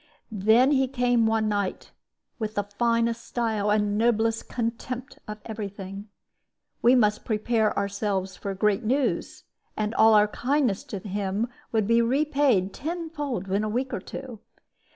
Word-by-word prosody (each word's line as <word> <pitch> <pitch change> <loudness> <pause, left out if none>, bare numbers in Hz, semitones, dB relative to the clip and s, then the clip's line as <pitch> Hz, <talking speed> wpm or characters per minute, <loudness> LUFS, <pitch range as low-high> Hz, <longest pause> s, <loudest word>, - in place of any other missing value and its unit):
"Then 220 +6 +4
he 265 -2 +3
came 245 -3 +2
one 220 -1 +1
night, 205 -2 -2 0.5
with 215 -1 -3
the 205 - +1
finest 230 +2 0
style 220 -4 -1
and 210 0 +1
noblest 225 -1 +1
contempt 240 +2 -4
of 210 0 -5
every 215 -2 -4
thing. 195 +1 -9 0.7
We 245 +2 +6
must 210 -3 +2
prepare 220 0 0
ourselves 200 -1 -1
for 195 -1 -5
great 210 +3 +1
news, 260 +5 -1 0.3
and 215 +1 -1
all 220 0 +6
our 210 0 +6
kindness 255 -4 0
to 200 - -5
him 200 +3 -2 0.2
would 220 -3 +1
be 230 +2 +4
repaid 265 -6 +2
tenfold 295 - -4
in 200 +2 +1
a 215 - -1
week 255 +4 -2
or - - -1
two. 255 -5 -8
220 Hz, 150 wpm, -26 LUFS, 205-245 Hz, 0.7 s, We